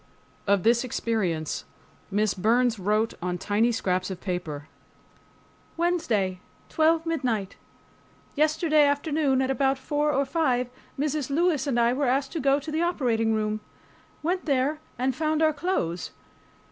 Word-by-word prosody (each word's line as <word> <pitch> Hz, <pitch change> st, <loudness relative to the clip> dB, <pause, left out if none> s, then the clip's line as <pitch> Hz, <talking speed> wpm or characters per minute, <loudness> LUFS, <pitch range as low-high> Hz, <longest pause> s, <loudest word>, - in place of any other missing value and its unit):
Of 200 Hz, -2 st, +3 dB
this 235 Hz, +2 st, +4 dB
experience, 195 Hz, -, -2 dB, 0.5 s
Miss 210 Hz, +1 st, +1 dB
Burns 230 Hz, +3 st, +2 dB
wrote 215 Hz, +4 st, +1 dB
on 180 Hz, 0 st, -2 dB
tiny 210 Hz, +6 st, +1 dB
scraps 185 Hz, -4 st, -1 dB
of 190 Hz, -, -5 dB
paper: 165 Hz, -6 st, -4 dB, 1.1 s
WEDNESDAY, 280 Hz, -, 0 dB, 0.3 s
12 325 Hz, +1 st, +2 dB
m. 245 Hz, -11 st, 0 dB, 0.9 s
Yesterday 310 Hz, 0 st, +3 dB
afternoon 285 Hz, -2 st, +1 dB
at 260 Hz, -, 0 dB
about 270 Hz, 0 st, +1 dB
four 295 Hz, +3 st, 0 dB
or 280 Hz, 0 st, +1 dB
five, 255 Hz, -5 st, 0 dB, 0.3 s
Mrs. 295 Hz, -2 st, -1 dB
Lewis 310 Hz, 0 st, +1 dB
and 245 Hz, -4 st, +1 dB
I 235 Hz, +1 st, +3 dB
were 275 Hz, +1 st, 0 dB
asked 270 Hz, +2 st, +1 dB
to 330 Hz, -, -3 dB
go 275 Hz, 0 st, +3 dB
to 305 Hz, +2 st, -7 dB
the 315 Hz, +2 st, 0 dB
operating 235 Hz, -10 st, +1 dB
room. 215 Hz, 0 st, -1 dB, 0.6 s
Went 360 Hz, +3 st, -1 dB
there 285 Hz, +1 st, +1 dB, 0.2 s
and 255 Hz, +1 st, 0 dB
found 310 Hz, +1 st, +1 dB
our 310 Hz, -1 st, +4 dB
clothes. 285 Hz, -, -2 dB
260 Hz, 140 wpm, -26 LUFS, 215-305 Hz, 1.1 s, this